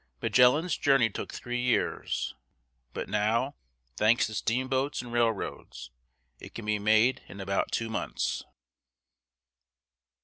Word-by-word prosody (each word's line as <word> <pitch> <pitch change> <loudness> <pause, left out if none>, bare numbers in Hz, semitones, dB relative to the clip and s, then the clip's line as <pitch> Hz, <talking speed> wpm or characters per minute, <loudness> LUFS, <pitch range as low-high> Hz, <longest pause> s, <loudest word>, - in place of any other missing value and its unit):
Magellan's 125 - +4
journey 135 -6 +3
took - - -5
three 120 0 -4
years, 125 -1 0 0.6
but - - -5
now, 115 +6 +1 0.4
thanks 110 +3 +4
to 110 - -6
steamboats 130 +5 -1
and 120 -1 -9
railroads, 115 - -2 0.5
it - - -12
can 115 - -6
be 105 -1 0
made 110 +5 +3
in 95 +3 -11
about 95 0 -1
two 115 - -1
months. 110 - -2
115 Hz, 115 wpm, -29 LUFS, 110-125 Hz, 0.6 s, Magellan's